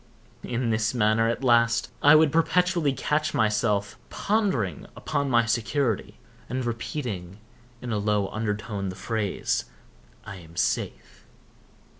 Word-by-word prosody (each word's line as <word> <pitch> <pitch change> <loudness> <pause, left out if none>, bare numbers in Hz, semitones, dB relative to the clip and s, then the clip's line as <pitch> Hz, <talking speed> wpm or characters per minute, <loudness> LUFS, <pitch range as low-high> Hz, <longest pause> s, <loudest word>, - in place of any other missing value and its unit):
In 120 -1 -2
this 110 +2 0
manner, 110 0 +3
at 120 +3 -3
last, 120 -2 +3
I 145 +1 +7
would 155 -1 +5
perpetually 170 -1 +2
catch 150 +3 -1
myself 105 -2 +1
pondering 190 - -1
upon 140 -1 -2
my 120 -2 +4
security, 115 +1 -1 0.3
and 130 0 -2
repeating, 115 - -4 0.5
in 120 - -4
a 105 - 0
low 105 -1 +1
undertone, 105 -2 -3
the 95 - -6
phrase, 105 0 -2 0.6
"I 105 -3 -8
am 85 -2 -14
safe." 90 - -3
115 Hz, 125 wpm, -26 LUFS, 105-135 Hz, 0.6 s, I